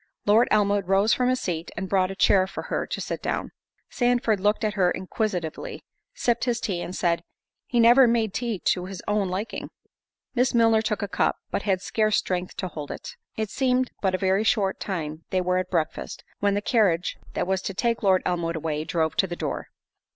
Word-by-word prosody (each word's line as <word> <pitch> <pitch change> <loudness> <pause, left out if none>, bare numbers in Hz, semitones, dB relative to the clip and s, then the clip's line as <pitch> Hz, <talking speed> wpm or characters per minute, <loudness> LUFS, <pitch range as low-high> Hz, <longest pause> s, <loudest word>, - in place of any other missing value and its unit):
Lord 220 +4 +5
Elmwood 205 -2 +2
rose 195 +3 +4
from 250 0 +2
his 255 0 +1
seat, 170 -2 -3
and 190 +1 -3
brought 185 -1 +2
a 195 - -5
chair 190 -1 +4
for - - -6
her - - -1
to - - -4
sit - - -4
down. - - -2 0.4
Sandford 245 -4 +2
looked 210 +3 +1
at 215 -1 +1
her 185 -4 +3
inquisitively, 185 -4 -3 0.3
sipped 240 - +1
his 240 -2 0
tea, 190 -7 -2
and 180 - -5
said, 170 -2 +1 0.5
"He 240 - +1
never 240 +3 +7
made 225 -3 +1
tea 235 -4 -2
to 180 -1 +1
his 190 -2 -8
own 205 -2 +1
liking." 195 +5 -4 0.6
Miss 250 -1 +2
Milner 225 -1 +5
took 210 -2 -2
a - - -1
cup, - - +1 0.2
but - - -1
had 190 0 +1
scarce 215 -1 +1
strength 180 -1 -2
to 185 - -2
hold 150 -5 -7
it. - - -7 0.2
It 220 -2 -2
seemed 255 -1 +1
but 190 -2 +1
a - - 0
very 190 +2 +2
short 205 -4 +1
time 160 -4 -4
they 185 - +1
were 180 0 +1
at 185 0 -3
breakfast, 165 -4 -2 0.2
when 200 0 +2
the 205 - -1
carriage, 195 -8 +2 0.2
that - - 0
was 190 +1 0
to 195 - -4
take 235 +2 0
Lord 190 -3 +3
Elmwood 170 -2 -1
away, 155 -1 -2
drove 160 -2 0
to 190 - +3
the 175 - -5
door. - - -4
195 Hz, 210 wpm, -25 LUFS, 180-225 Hz, 0.6 s, never